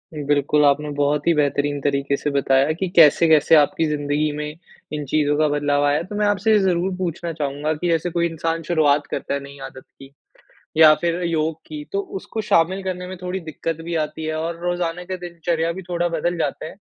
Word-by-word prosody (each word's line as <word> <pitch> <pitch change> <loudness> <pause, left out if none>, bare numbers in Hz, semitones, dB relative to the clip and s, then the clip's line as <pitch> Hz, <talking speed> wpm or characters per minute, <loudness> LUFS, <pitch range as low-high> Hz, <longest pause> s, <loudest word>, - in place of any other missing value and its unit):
बिल्कुल, 145 0 +1
आपने 145 +1 +2
बहुत 145 0 +1
ही 170 - +5
बेहतरीन 145 0 0
तरीके 140 0 0
से 150 - -2
बताया 135 +1 +2
कि 185 +3 -3
कैसे-कैसे 160 0 +6
आपकी 155 +2 +3
ज़िंदगी 150 0 -1
में 150 0 -4 0.5
इन 150 -1 -3
चीज़ों 145 +1 +1
का 155 - +3
बदलाव 145 -1 +1
आया। 145 +3 +1
तो 205 +3 -8
मैं 210 - +1
आपसे 205 +1 +1
ये 210 - +5
ज़रूर 185 0 +1
पूछना 170 -2 -3
चाहूँगा 150 0 -2
कि 175 +4 -3
जैसे 165 +1 +1
कोई 170 0 0
इंसान 165 0 -3
शुरुआत 150 -3 +2
करता - - -3
है 140 - -1
नई 140 0 -11
आदत 130 0 -11 0.2
की 135 0 -13 0.7
या 155 -1 +8
फिर 170 +1 -2
योग 160 -1 0
की, 150 -1 -7
तो 200 - -1
उसको 200 +3 -6
शामिल 185 +4 +2
करने 180 -1 -4
में 185 - -7
थोड़ी 180 +1 -3
दिक्कत 165 0 -5
भी 170 0 -3
आती 155 +1 -8
है 155 0 -2
और 165 +1 -3
रोज़ाना 175 0 -2
का 185 +1 -4
दिनचर्या 170 -1 -2
भी 190 - -7
थोड़ा 175 0 0
बदल 170 +1 -1
जाते 150 -1 -2
हैं। - - -9
160 Hz, 205 wpm, -21 LUFS, 145-175 Hz, 0.7 s, या